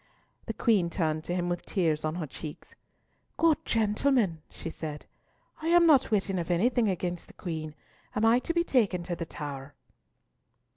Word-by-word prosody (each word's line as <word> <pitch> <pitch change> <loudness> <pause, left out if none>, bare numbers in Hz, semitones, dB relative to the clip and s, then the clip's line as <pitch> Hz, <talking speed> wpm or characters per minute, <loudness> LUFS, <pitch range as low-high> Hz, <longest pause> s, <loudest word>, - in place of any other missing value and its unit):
The - - -2
Queen 205 -8 +2
turned 155 -3 -1
to 175 - -2
him 175 -1 -1
with 175 0 -2
tears 160 -5 0
on 155 +1 -1
her 175 -3 -3
cheeks. 150 +2 -9 0.6
"Good 325 -3 +3
gentlemen," 215 - +1
she 165 - -7
said, 150 -2 -6 0.6
"I 320 - -3
am 345 0 +6
not 295 -5 +5
witting 195 -3 +1
of 170 - -4
anything 220 +5 +2
against 175 -2 -3
the - - -15
Queen. 155 -3 -5 0.4
Am 215 - +2
I 230 +2 +5
to 255 - -3
be 340 - +3
taken 205 - +1
to 175 0 -3
the 165 -1 -5
Tower?" 145 -2 -7
180 Hz, 175 wpm, -29 LUFS, 160-230 Hz, 0.6 s, am